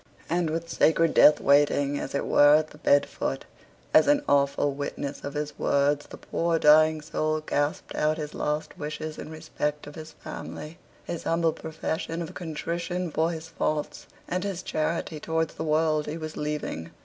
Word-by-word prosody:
And 170 -1 +1
with 165 +1 -3
sacred 165 0 +3
Death 150 - +7
waiting, 145 0 +3
as 135 - -5
it - - -1
were, 145 +1 +6
at 155 0 +1
the 150 - -15
bed 145 -1 +4
foot, - - -4 0.5
as - - +6
an 290 0 +4
awful 140 0 +2
witness 140 0 -5
of 140 - -5
his 150 0 -4
words, 145 +1 +1
the - - -10
poor 170 0 -1
dying 155 0 +5
soul 155 0 -1
gasped 145 -1 -2
out 155 +1 +1
his 150 -2 -5
last 150 +1 -3
wishes 155 +1 -5
in - - -7
respect 150 -2 -4
of 145 - -10
his 155 0 -9
family; 155 +2 -8 0.2
his 170 - -6
humble 165 -1 +2
profession 160 +1 -4
of 160 - -8
contrition 170 +1 -3
for 160 +2 +1
his 160 -1 -6
faults; 155 -2 -3 0.2
and 180 +1 -2
his 195 -3 -3
charity 155 -1 -2
towards 160 +1 -1
the - - -5
world 155 -1 +1
he 150 +2 -4
was 155 -1 -6
leaving. 150 - -4
155 Hz, 175 wpm, -26 LUFS, 150-165 Hz, 0.5 s, Death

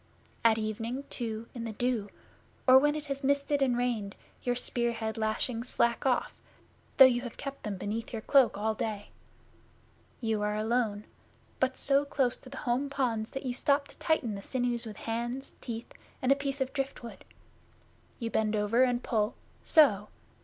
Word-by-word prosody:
At 225 -1 +5
evening, 225 +4 -3
too, 225 -2 -3
in 235 - -5
the 225 -1 -4
dew, 230 -2 -1 0.6
or 260 0 +9
when 295 +2 +2
it 300 -1 -4
has 275 -1 -4
misted 280 +1 +1
and 250 -3 +2
rained, 230 -5 -1 0.3
your 245 -1 0
spear 240 -1 0
head 220 -1 -3
lashings 225 +2 -1
slack 235 +3 +1
off, 255 - 0 0.6
though 270 - +11
you 245 -2 +3
have 240 -2 -8
kept 275 0 -6
them 205 -3 -4
beneath 215 +4 -4
your 225 -2 -5
cloak 270 -7 +4
all 220 +2 0
day. 215 -1 -4 1.1
You 220 -3 -1
are 210 0 0
alone 215 -1 0 0.6
but 260 0 +1
so 275 0 +3
close 270 -3 0
to 255 - -14
the 270 - -9
home 255 +4 +1
ponds 235 -6 -1
that 270 - -6
you 250 - -1
stop 280 +3 +1
to - - -14
tighten 275 -9 +1
the 200 - -6
sinews 245 0 -1
with 210 -2 -8
hands, 240 +4 -4
teeth, 230 -1 -6 0.3
and 255 - +2
a - - +7
piece 280 0 -3
of 265 0 -1
driftwood. 270 -4 -5 0.9
You 230 -2 -4
bend 215 0 +1
over 210 +4 +2
and 245 -1 +2
pull 215 0 0 0.3
so! 215 - +5
240 Hz, 175 wpm, -30 LUFS, 220-265 Hz, 1.1 s, though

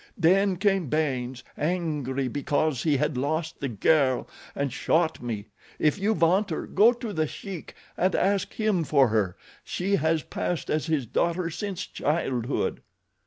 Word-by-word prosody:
Then 190 +2 +3
came 195 -5 +1
Baynes, 130 -5 -1
angry 150 -6 -1
because 145 +1 0
he 150 -3 +2
had 150 -1 0
lost 155 +4 -2
the 140 - -2
girl, 130 +4 +2 0.3
and 140 -3 -1
shot 160 0 +1
me. 110 -4 -4 0.3
If 155 +6 +2
you 210 +3 +2
want 185 +5 +3
her, 160 - -3
go 215 +5 +5
to 235 -3 -5
The 155 -3 0
Sheik 190 +1 -8 0.2
and 185 +1 +1
ask 195 +1 +1
him 215 -6 +1
for 140 -4 +4
her—she 110 - -2
has 160 +1 +1
passed 175 -3 -3
as 155 +1 0
his 155 -5 0
daughter 170 +8 0
since 195 +1 -4
childhood." 135 -5 -1
160 Hz, 150 wpm, -26 LUFS, 135-185 Hz, 0.3 s, go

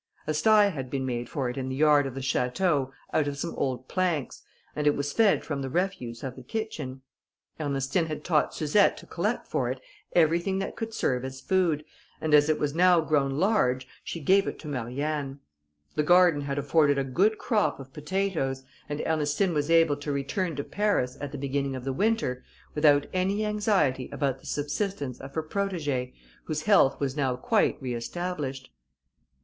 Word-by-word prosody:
A 155 - -1
sty 210 +6 +5
had 135 -8 -5
been 135 0 -2
made 120 -2 -3
for 135 -3 -2
it 125 - -4
in 130 -1 -3
the 130 - -3
yard 145 -1 +4
of 130 - -7
the 135 - -4
château, 135 +2 0 0.2
out 150 -2 +2
of 140 -1 -3
some 165 +4 -3
old 130 -1 -2
planks, 175 -7 -1 0.3
and 150 0 0
it 145 - +4
was 145 0 -2
fed 220 -3 +3
from 145 -3 -3
the 135 - -3
refuse 155 -8 -2
of 130 -2 -5
the - - -10
kitchen. 150 - -5 0.6
Ernestine 140 +2 0
had 155 -1 -5
taught 155 -4 +2
Suzette 160 +7 +3
to - - -11
collect - - -2
for - - -1
it - - -3 0.4
everything 170 +3 +3
that 195 - -3
could 225 -1 -4
serve 130 - 0
as 130 0 -6
food, 165 -1 +1 0.3
and 155 -1 -1
as 150 0 +6
it 155 - +3
was 145 -1 -1
now 180 +1 +5
grown 150 -3 +1
large, 130 - +2 0.2
she 170 - -5
gave 190 +6 +3
it - - -4
to 155 - -10
Marianne. 140 +2 -3 0.5
The - - +1
garden 175 -1 +5
had 140 0 -3
afforded 145 -1 +3
a 135 - +1
good 190 +12 +2
crop 210 - 0
of 135 0 -11
potatoes, 150 -5 -2 0.3
and 145 0 -3
Ernestine 160 +4 +1
was 145 0 -1
able 165 -3 +4
to 145 0 -4
return 150 +5 -2
to 140 - -3
Paris, 200 -12 0
at 145 -1 -4
the 145 - -6
beginning 140 0 -2
of 130 - -6
the 135 0 -2
winter, 200 - 0 0.3
without 145 -2 +4
any 195 +3 0
anxiety 205 - +1
about 135 -3 -1
the - - -14
subsistence 145 - -3
of 135 +1 -10
her 160 - -1
protegée, 155 -9 -2 0.3
whose 155 -1 -3
health 140 -10 +4
was 140 -1 -1
now 135 -4 0
quite 125 - +1
re 125 -2 -4
established. 135 0 -4
145 Hz, 190 wpm, -27 LUFS, 135-180 Hz, 0.6 s, as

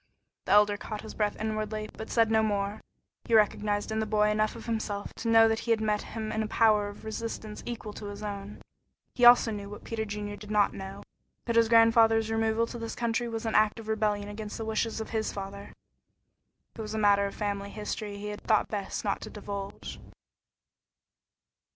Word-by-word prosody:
The 190 - +2
Elder 205 0 +5
caught 215 0 -6
his 220 - -9
breath 210 -1 0
inwardly, 215 0 -2
but 220 - -7
said 225 -2 +3
no 220 0 +4
more. 205 -1 -1 0.4
He 230 - +2
recognized 210 0 +2
in 220 - 0
the 220 - -1
boy 210 0 +3
enough 215 0 +1
of 225 - -9
himself 220 -3 -3
to 230 - -4
know 225 0 +7
that 225 0 +1
he 235 - -7
had 225 -1 +4
met 210 -1 0
in - - -10
him 220 -1 -4
a 215 - -1
power 215 -2 +3
of 205 +1 -10
resistance 220 -1 -5
equal 225 -3 -5
to 205 - -7
his 205 +1 -7
own. 200 0 -6 0.5
He 245 - +3
also 240 -1 +8
knew 200 -1 -5
what 205 - -9
Peter 225 -1 -3
Junior 205 -1 -5
did 210 0 -11
not 210 -1 +3
know, 195 0 -8 0.4
that 235 - -1
his 230 -1 +5
grandfather's 225 -1 +5
removal 225 +1 +1
to 235 +1 -8
this 230 0 -5
country 235 0 -1
was 225 0 -4
an 225 - -1
act 215 +1 +3
of 220 - -10
rebellion 210 -2 0
against 210 0 -6
the 225 - -4
wishes 220 +1 -1
of 220 - -6
his 220 -1 -1
father. 200 0 -7 1.0
It - - -6
was 215 0 -5
a - - -1
matter 200 -1 +4
of 200 - -8
family 200 -1 -3
history 210 0 -5
he 210 +1 -5
had 210 0 -6
thought 215 -2 +2
best 205 0 -4
not 200 - -1
to - - -7
divulge. 200 -1 -7
215 Hz, 205 wpm, -29 LUFS, 205-225 Hz, 1.0 s, also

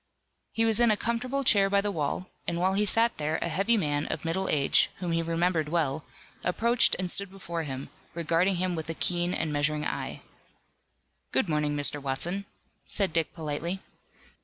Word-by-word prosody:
He 225 - +2
was 225 0 +3
in 240 -1 +5
a 210 - +3
comfortable 250 +5 -1
chair 200 -6 +4
by 200 0 +4
the 205 +1 0
wall, 165 +2 -2 0.2
and 170 - -1
while 185 +2 +2
he 205 +1 +2
sat 230 +3 +2
there 155 +1 0
a - - -2
heavy 200 +8 +2
man 145 -5 0
of - - -4
middle 190 +4 -1
age, 140 -2 +3
whom 180 -2 -3
he 165 0 +1
remembered 165 -1 0
well, 155 -3 0 0.4
approached 235 +6 +3
and 180 -1 +1
stood 200 -1 +1
before 175 -3 -5
him, 135 -3 -6 0.2
regarding 170 +3 +2
him 180 0 -1
with 160 -1 -5
a 165 - -2
keen 175 +1 +2
and 155 -4 -1
measuring 150 +1 0
eye. - - -4 1.1
"Good 235 - +1
morning, 150 -2 0
Mr. 145 0 +1
Watson," 175 +9 -2 0.4
said 195 -5 0
Dick 165 -1 +1
politely. 165 +3 -3
175 Hz, 185 wpm, -28 LUFS, 155-200 Hz, 1.1 s, in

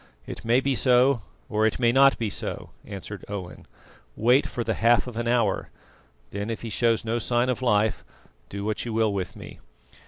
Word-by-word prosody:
"It - - -8
may 120 +3 +3
be 140 0 0
so, 125 0 +3 0.3
or 110 -2 +2
it 110 - -2
may 120 -2 +3
not 135 +2 +5
be 110 -3 -2
so," - - -5
answered 100 0 -8
Owen. 95 -3 -7 0.5
"Wait 125 +5 +3
for 120 - -4
the 110 - -1
half 115 +2 +3
of 125 -3 -8
an 120 +1 -2
hour; 115 -4 +1 0.6
then, 100 +2 -4
if 115 - -5
he 115 - -5
shows 115 -1 +1
no 115 +1 -1
sign 120 +2 0
of 125 - -1
life, 110 -3 +1 0.5
do 100 0 -5
what 110 0 -2
you 115 - -5
will 110 -2 +1
with 95 -3 -4
me." - - -11
115 Hz, 195 wpm, -25 LUFS, 105-125 Hz, 0.6 s, not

